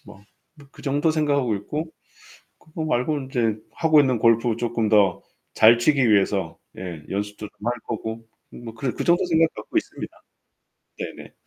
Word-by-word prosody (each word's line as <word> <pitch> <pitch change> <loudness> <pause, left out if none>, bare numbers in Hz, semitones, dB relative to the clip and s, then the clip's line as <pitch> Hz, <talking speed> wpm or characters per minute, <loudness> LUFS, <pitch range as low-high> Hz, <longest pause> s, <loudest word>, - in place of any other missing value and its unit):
뭐 95 - -14 0.5
그 145 - -15
정도 145 +3 +1
생각하고 140 -7 +1
있고 150 +11 -5 0.7
그거 160 0 -7
말고는 140 -1 -1
이제 115 -4 +1 0.2
하고 155 -2 +4
있는 130 -4 +2
골프 115 0 +3
쪼끔 115 -2 -1
더 100 -4 +3 0.3
잘 115 +2 +7
치기 130 -2 +3
위해서 100 -4 +1 0.2
예, 90 -4 -6
연습도 105 +2 -4
좀 105 - -12
할 - - +2
거고 110 0 -5 0.3
음 120 - -11
뭐 115 -1 -8
그래 125 +3 -2
그 - - -2
정도 175 +2 +3
생각 165 -1 +3
갖고 - - -8
있습니다. - - -3 0.9
네네. - - -8
120 Hz, 300 characters per minute, -23 LUFS, 110-150 Hz, 0.9 s, 잘